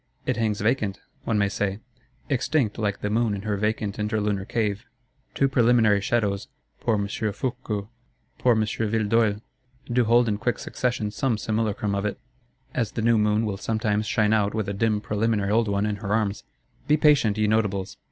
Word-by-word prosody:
It -, -, 0 dB
hangs 110 Hz, -3 st, -1 dB
vacant, 105 Hz, -3 st, 0 dB, 0.3 s
one 110 Hz, -, +1 dB
may 100 Hz, -1 st, +3 dB
say; 100 Hz, 0 st, -2 dB, 0.5 s
extinct, 130 Hz, -4 st, 0 dB
like 105 Hz, -2 st, -1 dB
the 105 Hz, -, -1 dB
Moon 110 Hz, -1 st, +1 dB
in 100 Hz, -, -6 dB
her 105 Hz, -1 st, -1 dB
vacant 105 Hz, 0 st, -1 dB
interlunar 105 Hz, -2 st, -1 dB
cave. 110 Hz, 0 st, -1 dB, 0.5 s
Two 140 Hz, -, +3 dB
preliminary 115 Hz, -5 st, +4 dB
shadows, 100 Hz, -2 st, 0 dB, 0.3 s
poor 115 Hz, -, +1 dB
M. 100 Hz, -1 st, -1 dB
Fourqueux, 110 Hz, 0 st, -3 dB, 0.5 s
poor 125 Hz, -2 st, +4 dB
M. 110 Hz, -, +2 dB
Villedeuil, 110 Hz, 0 st, +1 dB, 0.4 s
do 120 Hz, 0 st, +1 dB
hold 120 Hz, +2 st, +4 dB
in 105 Hz, -1 st, -1 dB
quick 120 Hz, -2 st, 0 dB
succession 120 Hz, -4 st, -2 dB
some 115 Hz, +2 st, 0 dB
simulacrum 105 Hz, -1 st, -1 dB
of 100 Hz, +1 st, 0 dB
it,—as 125 Hz, 0 st, -7 dB
the 115 Hz, -, -2 dB
new 115 Hz, -1 st, +4 dB
Moon 105 Hz, +1 st, +2 dB
will 100 Hz, -2 st, -2 dB
sometimes 110 Hz, 0 st, -1 dB
shine 110 Hz, -1 st, +2 dB
out 105 Hz, -1 st, +1 dB
with 110 Hz, -3 st, -1 dB
a 100 Hz, -, -2 dB
dim 105 Hz, +1 st, +1 dB
preliminary 105 Hz, -1 st, 0 dB
old 115 Hz, +1 st, +3 dB
one 100 Hz, 0 st, 0 dB
in 105 Hz, -1 st, -1 dB
her 100 Hz, -1 st, -5 dB
arms. 105 Hz, -2 st, 0 dB, 0.4 s
Be 150 Hz, +2 st, +4 dB
patient, 145 Hz, -9 st, +4 dB
ye 110 Hz, -, +2 dB
Notables! 100 Hz, -2 st, 0 dB
110 Hz, 175 wpm, -25 LUFS, 105-115 Hz, 0.5 s, preliminary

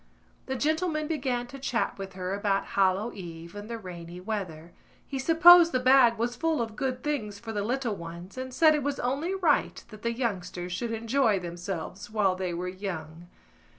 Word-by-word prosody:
The 265 Hz, -, -2 dB
gentleman 310 Hz, +3 st, 0 dB
began 260 Hz, -6 st, -1 dB
to 275 Hz, +3 st, -10 dB
chat 245 Hz, -6 st, -1 dB
with 195 Hz, -1 st, -6 dB
her 185 Hz, 0 st, -4 dB
about 200 Hz, -1 st, 0 dB
Hallow 195 Hz, +4 st, +2 dB
Eve 170 Hz, -2 st, -9 dB
and 205 Hz, +1 st, -8 dB
the 230 Hz, -, -4 dB
rainy 175 Hz, -4 st, -9 dB
weather. 180 Hz, -5 st, -5 dB, 0.3 s
He 270 Hz, -, -4 dB
supposed 335 Hz, +3 st, +8 dB
the 255 Hz, -, +3 dB
bag 255 Hz, -2 st, +5 dB
was 240 Hz, +2 st, -1 dB
full 325 Hz, -2 st, 0 dB
of 225 Hz, -2 st, -3 dB
good 255 Hz, -1 st, -2 dB
things 235 Hz, -9 st, -2 dB
for 225 Hz, +1 st, -7 dB
the 205 Hz, -, -1 dB
little 240 Hz, 0 st, -1 dB
ones 170 Hz, +1 st, -9 dB
and 260 Hz, 0 st, -5 dB
said 310 Hz, +4 st, +5 dB
it 300 Hz, -, 0 dB
was 285 Hz, 0 st, -2 dB
only 285 Hz, +10 st, -1 dB
right 340 Hz, -6 st, +1 dB
that 215 Hz, -2 st, -12 dB
the 235 Hz, -, 0 dB
youngsters 185 Hz, -7 st, -3 dB
should 230 Hz, +5 st, -3 dB
enjoy 230 Hz, 0 st, +2 dB
themselves 175 Hz, +2 st, -6 dB
while 210 Hz, -3 st, +2 dB
they 185 Hz, -1 st, -3 dB
were 175 Hz, +1 st, -3 dB
young. 175 Hz, -3 st, -6 dB
220 Hz, 185 wpm, -28 LUFS, 185-265 Hz, 0.3 s, supposed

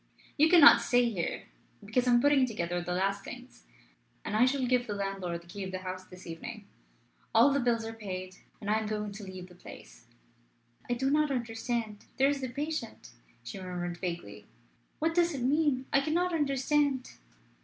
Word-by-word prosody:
You 310 Hz, +2 st, +5 dB
cannot 330 Hz, -5 st, +9 dB
stay 245 Hz, -1 st, +2 dB
here, 175 Hz, -6 st, -3 dB, 0.4 s
because 245 Hz, +4 st, 0 dB
I -, -, +5 dB
am 240 Hz, 0 st, +5 dB
putting 285 Hz, -2 st, +4 dB
together 175 Hz, -6 st, -2 dB
the 180 Hz, +1 st, -3 dB
last 195 Hz, +2 st, 0 dB
things, -, -, -11 dB, 0.6 s
and 210 Hz, -, -3 dB
I 230 Hz, +3 st, +5 dB
shall 260 Hz, 0 st, +1 dB
give 245 Hz, 0 st, +1 dB
the 205 Hz, -, -3 dB
landlord 195 Hz, -4 st, -3 dB
the -, -, -20 dB
key 200 Hz, +2 st, -6 dB
of 190 Hz, -, -5 dB
the 185 Hz, -, -3 dB
house 185 Hz, 0 st, -5 dB
this 180 Hz, 0 st, -13 dB
evening. 215 Hz, +6 st, -8 dB, 0.7 s
All 285 Hz, -, +7 dB
the 280 Hz, -, +2 dB
bills 235 Hz, -3 st, +1 dB
are 225 Hz, -, -5 dB
paid, 185 Hz, -4 st, -6 dB, 0.2 s
and 205 Hz, -, -8 dB
I 215 Hz, -, +3 dB
am 220 Hz, -, -4 dB
going 210 Hz, -1 st, -3 dB
to 205 Hz, +1 st, -9 dB
leave 185 Hz, -2 st, -8 dB
the 180 Hz, -, -16 dB
place." -, -, -13 dB, 0.8 s
"I 245 Hz, -, +1 dB
do 265 Hz, +3 st, 0 dB
not 300 Hz, 0 st, +3 dB
understand. 230 Hz, -3 st, -3 dB
There 270 Hz, +1 st, +4 dB
is 285 Hz, -1 st, -1 dB
the 260 Hz, -, -3 dB
patient," 290 Hz, -2 st, -5 dB, 0.3 s
she 120 Hz, +11 st, -7 dB
murmured 175 Hz, -1 st, -4 dB
vaguely. 175 Hz, -1 st, -6 dB, 0.5 s
"What 325 Hz, +2 st, 0 dB
does 340 Hz, -2 st, +2 dB
it 255 Hz, -, -3 dB
mean? 280 Hz, -1 st, +2 dB
I 275 Hz, -, +5 dB
cannot 345 Hz, +5 st, 0 dB
understand." 280 Hz, -2 st, +1 dB
230 Hz, 190 wpm, -30 LUFS, 185-275 Hz, 0.8 s, cannot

